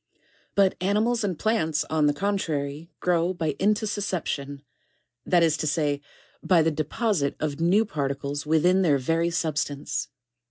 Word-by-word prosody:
8. - - -38 0.4
But 195 -2 +4
animals 215 +5 +1
and 185 -5 -1
plants 160 -9 0
on 155 -1 +2
the 145 - +3
contrary 155 -5 -2
grow 175 +1 +1
by 160 -3 -1
intussus 210 +1 +1
ception, 145 -7 -3 0.7
that 175 -2 +4
is 160 -2 +3
to 155 - -2
say, 145 -1 0 0.4
by 175 -4 +4
the 160 - +2
deposite 155 - -1
of 150 -1 -3
new 195 +7 +4
particles 140 -4 -3
within 165 +5 +3
their 155 -6 +3
very 165 +6 0
substance. 150 -4 -2
165 Hz, 150 wpm, -25 LUFS, 145-190 Hz, 0.7 s, But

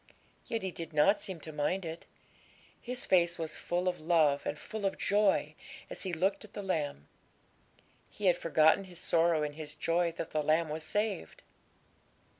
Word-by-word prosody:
Yet 225 -2 -2
he 190 - -2
did 165 -2 -7
not 175 +8 +4
seem 185 -4 -4
to 155 - -7
mind 155 +5 -1
it; 165 +1 -7 0.7
his 250 0 -3
face 175 -2 +3
was 160 -2 -4
full 175 +1 -2
of 180 -1 0
love 155 -3 +2
and 145 - -2
full 215 +6 -7
of 195 - 0
joy 205 -1 +2 0.4
as - - -5
he 190 - -3
looked 185 +6 0
at 215 - -14
the 205 - -5
lamb. 150 - -2 1.0
He 210 - -6
had 180 -2 +6
forgotten 160 +2 +3
his 180 -2 -11
sorrow 165 -2 +2
in 150 -1 -3
his 155 0 -8
joy 170 +1 +1
that 165 - -5
the 155 - 0
lamb 155 +2 +2
was 155 +1 -4
saved. 205 - -2
170 Hz, 180 wpm, -31 LUFS, 155-190 Hz, 1.0 s, had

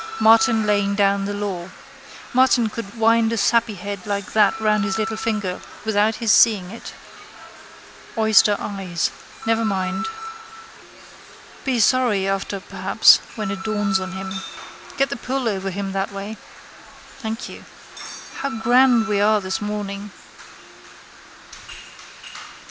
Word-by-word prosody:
Martin 225 0 +5
laying 200 -1 +1
down 200 -1 +2
the 200 - -3
law. 190 -4 -4 0.6
Martin 250 -3 +4
could 230 -1 -8
wind 225 0 +3
a 230 - -1
sappyhead 205 -3 0
like 200 -1 -3
that 210 -1 +3
round 215 -1 +2
his 220 +1 -1
little 220 0 -2
finger, 215 -5 -3 0.2
without 215 0 +2
his 225 -2 0
seeing 200 -6 +4
it. 230 - -9 1.2
Oyster 220 -2 +4
eyes. 190 -4 -3 0.3
Never 225 0 +1
mind. 190 - -1 1.6
Be 260 -3 0
sorry 220 -4 +2
after 195 0 -2
perhaps 190 - +4 0.2
when 215 -4 -3
it 190 0 -5
dawns 210 -3 0
on 190 0 -6
him. 190 0 -6 0.6
Get 275 0 +1
the - - -2
pull 255 +1 -3
over 195 -3 -2
him 195 +1 -4
that 195 +1 -2
way. 200 +2 -6 0.8
Thank 225 -2 -5
you. - - -11 0.7
How 275 - -2
grand 240 0 +3
we 205 -2 +1
are 215 +1 +4
this 190 +1 -4
morning! 205 -1 -4
210 Hz, 125 wpm, -21 LUFS, 195-225 Hz, 1.6 s, Martin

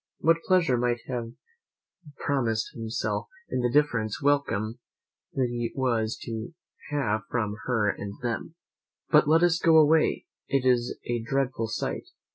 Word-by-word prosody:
What 165 +1 +3
pleasure 170 -10 +3
might 120 -1 0
he 130 - -6
have 115 -1 -4 0.8
promised 115 -6 -1
himself 110 -2 -3 0.2
in - - 0
the 120 0 +1
different 120 -7 +2
welcome 130 -6 +1 0.6
he 120 -3 -1
was 115 -4 0
to 115 +6 -6 0.3
have 120 -8 0
from 105 -4 -1
her 115 -4 +1
and 100 0 -7
them! 120 +7 -3 0.6
But 150 -1 +6
let 165 +2 +5
us 175 -1 +3
go 165 -1 +5
away; 155 0 +4 0.2
it 135 -1 +1
is 125 -1 +2
a 120 -1 -1
dreadful 130 -1 -1
sight! 110 - -3
125 Hz, 140 wpm, -27 LUFS, 115-145 Hz, 0.8 s, But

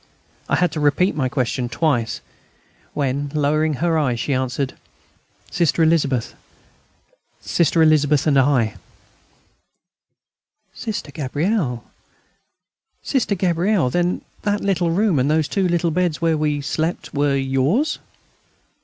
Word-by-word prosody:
I - - +3
had 180 -3 +1
to 155 - -4
repeat 150 +6 +2
my 130 -4 0
question 125 -1 -1
twice, 125 -7 0 0.7
when, 140 0 -1
lowering 150 +1 +1
her 165 +2 +1
eyes, 125 -6 0
she 140 - -1
answered: 130 +1 -2 0.8
"Sister 170 -1 +2
Elizabeth 145 -7 +1 1.1
Sister 165 -1 +2
Elizabeth... 150 -2 +3
and 140 -3 +4
I." 130 -5 +2 2.0
"Sister 205 -9 -5
Gabrielle,... 145 - -1 1.2
Sister 250 -7 0
Gabrielle, 175 -4 +1
then 175 +3 0 0.2
that 205 0 0
little 180 -4 +1
room 185 -2 +2
and 130 +3 +1
those 155 -1 +2
two 195 -2 0
little 175 -1 +1
beds 175 -2 0
where 165 -1 +2
we 150 -1 0
slept, 155 +2 -3
were 145 -1 +1
yours?" 135 - +1
155 Hz, 120 wpm, -21 LUFS, 140-175 Hz, 2.0 s, and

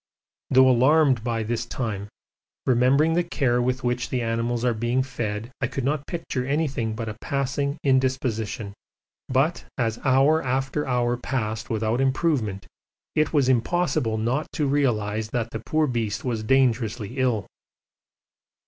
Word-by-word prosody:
Although 130 0 +6
alarmed 130 -1 +4
by 115 -1 -1
this 115 +1 -2
time, 110 -5 -3 0.6
remembering 135 +6 +3
the 175 +1 +2
care 130 -7 +1
with 130 +1 -1
which 120 0 -1
the 125 -2 -1
animals 115 +1 -1
are 120 - +3
being 120 +4 0
fed 115 -3 -4
I 125 - +1
could 135 +1 -4
not 145 +2 -1
picture 165 -7 -3
anything 135 -6 -1
but 115 0 -4
a 110 - -4
passing 140 +1 -1
indisposition. 130 -5 0 0.6
But 135 +6 +1
as 115 -3 -1
hour 135 +4 +3
after 135 +3 -1
hour 120 -1 +1
passed 115 -4 -3
without 110 +2 0
improvement, 130 - 0 0.5
it 155 0 +1
was 145 -5 +3
impossible 130 -3 +1
not 120 +7 -1
to 150 - 0
realise 110 -7 0
that 115 0 -3
the 110 - -5
poor 155 0 +1
beast 115 -5 -2
was 115 -3 -1
dangerously 120 -1 +1
ill. 120 -6 +1
125 Hz, 145 wpm, -24 LUFS, 115-135 Hz, 0.6 s, Although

